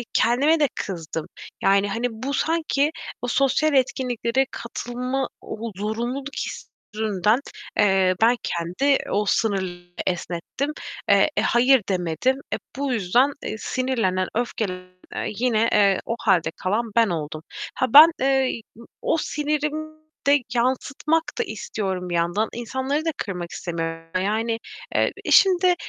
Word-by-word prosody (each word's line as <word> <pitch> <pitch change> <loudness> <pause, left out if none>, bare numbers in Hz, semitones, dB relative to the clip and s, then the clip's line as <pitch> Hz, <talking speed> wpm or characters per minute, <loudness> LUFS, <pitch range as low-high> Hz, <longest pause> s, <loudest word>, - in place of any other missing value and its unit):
kendime 285 +8 +3
de 290 - +4
kızdım. 165 -4 -5 0.4
Yani, 195 +1 +4
hani, 235 +4 -1
bu 260 +5 -4
sanki 315 -3 +1 0.3
o 245 - -1
sosyal 275 +4 +2
etkinliklere 260 -1 +1
katılma, 250 +3 -3
o 225 0 -6
zorunluluk 240 +7 -3
hissinden, 215 +1 -1 0.4
eee, 190 -3 +4
ben 235 +2 +5
kendi 180 +12 +1
o 205 +1 +1
sınır 190 -6 0 0.2
esnettim. 180 - -2 0.4
Eee, - - +5
"hayır" 250 0 +4
demedim. 180 - 0 0.2
Eee, - - 0 0.2
bu 275 -2 -1
yüzden, 240 +7 +3
eee, - - -3
sinirlenen, 225 -9 0
öfkelenen 195 -6 -2 0.5
yine, 230 -2 +2
eee, 200 -2 +4
o 230 - -1
hâlde 165 -3 +2
kalan 220 +5 -1
ben 230 -2 +5
oldum. 155 -3 -4 0.3
Ha, 255 - +1
ben, 315 +3 +11
eee, 265 -3 +2 0.2
ı 235 - -11 0.2
o - - +2
sinirimi 305 +1 -2 0.3
de 285 0 +5
yansıtmak 270 +6 +1
da 465 - +1
istiyorum 190 - -4
bir - - -2
yandan. 175 +6 +1
İnsanları 265 +6 -2
da 325 - +1
kırmak 180 -4 -4
istemiyorum 165 -1 -4
yani. 225 +3 0 0.4
Eee, - - +2 0.2
şimdi, 365 -1 +6
235 Hz, 125 wpm, -23 LUFS, 190-270 Hz, 0.5 s, ben